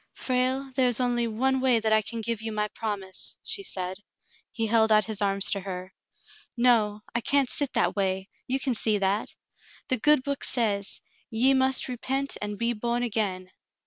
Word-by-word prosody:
"Frale, 260 +1 -1
there 255 -1 +4
is 245 - 0
just 240 -2 +1
one 265 +4 +1
way 255 -3 +4
that 220 0 +1
I 215 - +5
can 230 +2 -5
give 230 0 -2
you 225 0 -3
my 210 0 0
promise," 205 -4 -6
she 400 - -2
said. 185 - -5 0.5
He 225 - -2
held 220 0 +3
out 215 -1 +5
his 215 -2 -4
arms 200 0 +3
to 200 - 0
her. 185 -1 -7 0.6
"No, 220 -4 +3
I 235 - 0
can't 275 +1 +2
sit 285 -3 0
that - - +1
way; 190 -1 -1 0.2
you 265 +2 0
can 265 -1 0
see 215 -2 +2
that. 200 +2 -1 0.5
The 255 - +2
good 295 +2 +4
book 280 -1 -3
says, 205 -5 0 0.3
'Ye 250 +5 +3
must 265 0 +2
repent 270 +2 -1
and 210 0 -4
be 235 +2 0
born 235 +2 -2
again.'" 200 -5 -2
225 Hz, 185 wpm, -26 LUFS, 205-255 Hz, 0.6 s, I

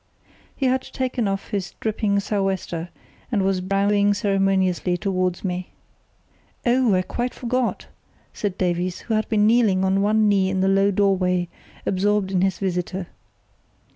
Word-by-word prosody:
He 270 - -2
had 260 0 +2
taken 255 -5 -2
off 195 0 -3
his 195 -3 -3
dripping 210 -2 0
sou' 205 -1 -1
wester 175 -3 -3 0.4
and 205 -5 +1
was 190 -1 +1
bowing 200 +2 +2
ceremoniously 195 -3 +1
towards 185 -2 -1
me. 180 -1 -3 1.0
"Oh, 240 -4 +3
I 185 - +1
quite 245 +6 -3
forgot!" 250 0 -1 0.5
said 200 -3 -3
Davies, 180 0 -1
who 230 - -3
had 215 0 0
been 210 -2 +3
kneeling 215 -5 +3
on 190 +1 +2
one 215 +1 +3
knee 195 -2 +3
in 190 0 0
the 190 - +2
low 195 +1 +3
doorway, 185 -3 +1 0.4
absorbed 200 0 +1
in 185 -2 +1
his 190 -2 +1
visitor. 180 -1 -3
195 Hz, 150 wpm, -23 LUFS, 185-210 Hz, 1.0 s, Oh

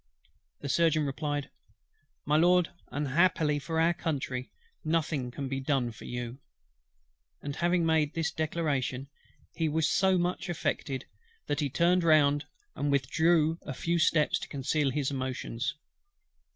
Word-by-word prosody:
The - - -4
Surgeon 155 0 +3
replied: 145 0 -3 0.7
"My 150 - +2
Lord, 175 +2 +4 0.2
unhappily 150 +1 +2
for 160 +3 -2
our 165 +1 +4
Country, 135 -7 -3 0.3
nothing 155 -5 0
can 135 +3 -5
be 135 0 -2
done 130 -3 0
for 110 - -12
you;" 120 +1 -5 1.0
and 145 0 -6
having 175 0 +2
made 160 -2 +2
this 165 0 0
declaration 145 -4 -2 0.4
he 160 -2 0
was 155 0 +1
so 190 +2 +3
much 180 +1 -1
affected, 140 -5 -2 0.4
that 145 - -1
he 145 -2 0
turned 175 +5 +3
round 145 -3 +4 0.3
and 145 +1 -1
withdrew 160 +4 +2
a 135 - -6
few 170 +4 0
steps 155 -1 +3
to - - -7
conceal 140 +1 0
his 140 +1 -1
emotions. 130 -2 -3
150 Hz, 140 wpm, -29 LUFS, 135-165 Hz, 1.0 s, Lord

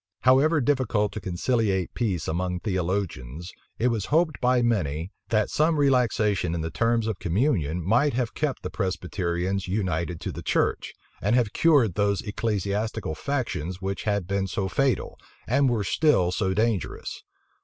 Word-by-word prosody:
However 140 +5 +4
difficult 120 -6 +1
to 110 - -6
conciliate 95 0 0
peace 95 -10 -1
among 90 +2 -2
theologians, 90 - -3 0.3
it 125 - +2
was 110 -5 -1
hoped 155 0 +1
by 125 0 +3
many, 90 -7 0 0.2
that 110 -2 +1
some 155 +1 +2
relaxation 110 - +2
in 85 - -2
the 80 0 -3
terms 115 -1 +1
of 110 -4 -3
communion 90 - 0
might 120 +9 +3
have 125 -3 -1
kept 150 -3 -2
the - - -4
Presbyterians 95 0 -2
united 90 -4 -1
to - - -3
the - - -7
church, - - 0 0.3
and 105 +4 +2
have 120 -5 +1
cured 140 - +4
those 100 +1 +1
ecclesiastical 105 -2 -2
factions 95 - -3
which 95 +1 -4
had 100 -3 0
been 95 +1 -1
so 95 +1 -2
fatal, 135 +6 0 0.3
and 135 +3 +3
were 115 -4 0
still 95 - +2
so 95 +1 0
dangerous. 110 -3 -1
105 Hz, 155 wpm, -26 LUFS, 90-120 Hz, 0.3 s, However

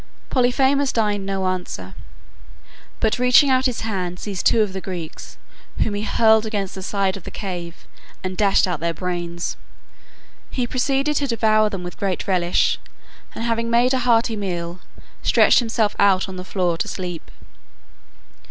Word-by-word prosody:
Polyphemus 265 +2 +2
deigned 205 -3 0
no 195 -1 -1
answer, 180 - -4 1.1
but 220 +2 +1
reaching 250 +3 +5
out 260 0 +3
his 250 - -3
hand 185 -5 -3
seized 195 -4 -1
two 225 - +4
of 200 -3 -4
the 190 - -4
Greeks, 175 -5 -7 0.4
whom 215 - 0
he 205 - -2
hurled 220 +1 +4
against 205 -4 -3
the 190 - -7
side 195 0 0
of 195 - -9
the - - -7
cave, 175 -4 -6 0.4
and 185 0 -3
dashed 200 0 +3
out 175 -4 -2
their 170 +1 -2
brains. 175 -1 -3 0.9
He 250 - -1
proceeded 275 +4 0
to 285 - 0
devour 215 -3 +3
them 195 -3 -5
with 175 0 -8
great 195 0 -2
relish, 180 -2 +2 0.6
and - - -4
having 230 0 -1
made 240 +2 +3
a 260 - +2
hearty 235 -2 +2
meal, 175 -3 -4 0.4
stretched - - +5
himself 225 -3 0
out 195 -2 +4
on 190 - -7
the 180 - -6
floor 180 -3 -1
to - - -1
sleep. 180 -3 -6
200 Hz, 160 wpm, -21 LUFS, 180-230 Hz, 1.1 s, reaching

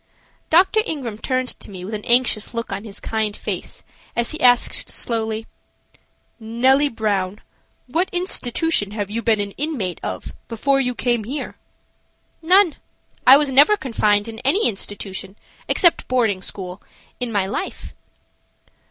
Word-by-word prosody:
Dr. 380 +6 +5
Ingram 260 - -4
turned 255 0 -1
to - - -9
me 185 -2 -8
with 210 - -7
an 210 -1 -4
anxious 240 -2 +2
look 230 0 -3
on 200 - -5
his 205 -2 -6
kind 215 -2 -2
face - - -5 0.3
as 235 0 0
he 315 - -5
asked, 245 -1 +3
slowly: 225 -1 -2 0.9
"Nellie 260 +6 +3
Brown, 205 -4 -1 0.5
what 325 +9 0
institution 325 - -1
have 205 -2 -4
you 230 +2 -2
been 225 -2 +2
an 200 0 -2
inmate 255 - -2
of 95 -1 -5
before 275 +4 +1
you 250 -2 -1
came 240 -4 0
here?" 275 +6 -5 0.9
"None. 360 +1 +4 0.5
I 265 +2 +11
never 290 +5 +5
was 420 - -1
confined 210 -4 +1
in 225 -1 -7
any 320 - +3
institution, 195 -2 -5 0.3
except 345 -2 +3
boarding 225 -7 +1
school, 185 0 -6 0.4
in 245 -2 -1
my 200 -3 +1
life." 205 - -5
230 Hz, 145 wpm, -21 LUFS, 210-275 Hz, 0.9 s, I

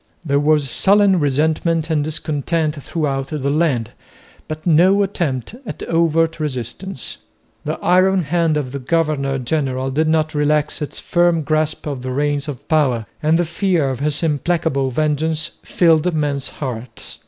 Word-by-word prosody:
There 140 -2 +2
was 150 -1 +2
sullen 195 - +4
resentment 160 +3 +1
and 150 -2 +1
discontent 155 0 -1
throughout 135 -4 -2
the 140 -2 -2
land, 145 -8 0 0.6
but 155 0 -6
no 185 +5 +5
attempt 160 - -2
at 225 - -7
overt 165 -1 +1
resistance. 135 - -5 0.5
The - - -2
iron 185 +1 +3
hand 165 0 +1
of 135 -4 -3
the 140 - -4
governor 140 -1 0
general 130 0 -1
did 155 +4 +1
not 155 0 +1
relax 150 +1 +1
its 150 - -4
firm 175 -2 +2
grasp 155 +1 -1
of 140 -4 -4
the 130 - -5
reins 145 +2 -1
of 145 0 -7
power, 135 -8 +2 0.2
and 155 +2 +3
the 175 - +1
fear 170 -4 0
of 130 - -5
his 150 +2 0
implacable 155 -2 0
vengeance 155 +3 -1
filled 165 0 +3
men's 145 -2 -1
hearts. 125 -4 -7
155 Hz, 150 wpm, -19 LUFS, 140-165 Hz, 0.6 s, no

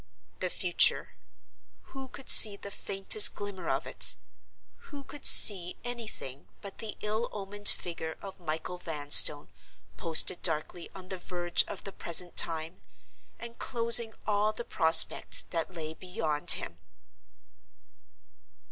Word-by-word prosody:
The 185 - -6
future! 175 -1 -1 0.8
Who 270 -1 -13
could 265 +1 -17
see 210 -2 +8
the 200 - -13
faintest 195 +2 +1
glimmer 205 -2 -11
of - - -6
it? - - 0 0.7
Who 285 -1 -14
could 290 +1 +1
see 180 -4 +7
anything 225 - -11
but 200 -2 -15
the 220 -2 -11
ill 215 +3 -7
omened 205 0 -5
figure 160 -2 -10
of 195 -1 -15
Michael 165 +1 -10
Vanstone, 145 -4 +2 0.5
posted 165 +2 0
darkly 165 +1 -5
on 185 -1 -16
the 190 - -10
verge 175 -1 -5
of - - -13
the 195 - -12
present 175 +1 -5
time—and 165 +7 -8
closing 230 -2 -1
all 210 0 -4
the 235 +2 -12
prospect 160 -2 +1
that 170 +2 -8
lay 160 -1 -9
beyond 160 -4 -5
him? 85 +1 -11
185 Hz, 125 wpm, -24 LUFS, 165-215 Hz, 0.8 s, see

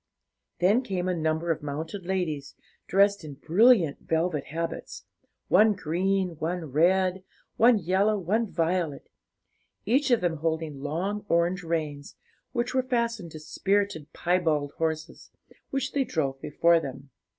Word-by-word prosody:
Then 200 +7 +3
came 185 -7 -3
a 185 - +1
number 160 0 0
of 160 - -2
mounted 160 +6 -5
ladies, 155 -7 -2 0.3
dressed 200 0 +3
in 150 -3 -8
brilliant 175 - +4
velvet 160 -2 -1
habits, 165 +2 -5 0.4
one 215 0 +5
green, 190 +2 0
one 165 -2 -3
red, 185 +5 +2 0.3
one 235 0 +6
yellow, 195 +4 +1
one 210 +5 0
violet; 165 -3 -1 0.7
each 265 +7 +2
of 240 -3 +4
them 170 -2 0
holding 160 -2 -2
long 180 +8 -2
orange 170 +3 +2
reins, 155 -4 -3 0.4
which 245 0 -2
were 260 - +3
fastened 235 -7 -1
to 155 - -7
spirited 195 0 -1
piebald 160 -5 0
horses, 160 0 -3 0.4
which 270 -1 -2
they 280 - +1
drove 135 - -2
before 165 +3 +3
them. 135 -2 -8
175 Hz, 135 wpm, -27 LUFS, 155-200 Hz, 0.7 s, one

